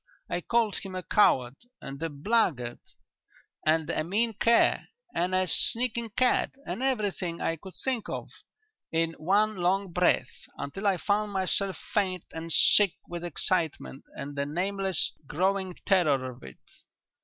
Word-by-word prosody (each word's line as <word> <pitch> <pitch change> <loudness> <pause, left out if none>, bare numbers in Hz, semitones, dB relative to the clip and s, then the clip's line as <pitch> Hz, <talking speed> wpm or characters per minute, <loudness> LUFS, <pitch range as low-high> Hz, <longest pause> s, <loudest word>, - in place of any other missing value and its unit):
I 175 - -1
called 230 +1 +1
him 190 -1 -7
a 185 - -4
coward 130 -11 +3 0.2
and 140 +2 -8
a 165 - -1
blackguard 145 - 0 0.9
and 160 0 +3
a 155 - -1
mean 220 +7 0
cur 230 +3 +4 0.3
and 180 +2 0
a 185 0 +3
sneaking 235 +3 0
cad 255 0 +2
and - - -4
everything 205 -9 -1
I 165 - -1
could 190 +4 -12
think 255 -5 -2
of - - -5 0.6
in 165 0 +1
one 205 +6 +2
long 185 +2 +1
breath, 175 -7 +1
until 195 +9 -3
I 195 -2 +3
found 205 +2 0
myself 190 0 0 0.2
faint 185 -4 0
and 165 +1 -6
sick 200 +3 +6
with 175 0 -6
excitement 165 -4 -1
and 145 +1 -6
the 140 0 -1
nameless 190 +3 -1 0.2
growing 190 +3 0
terror 145 -10 +2
of 120 - -15
it. 65 -1 -11
185 Hz, 145 wpm, -28 LUFS, 160-205 Hz, 0.9 s, sick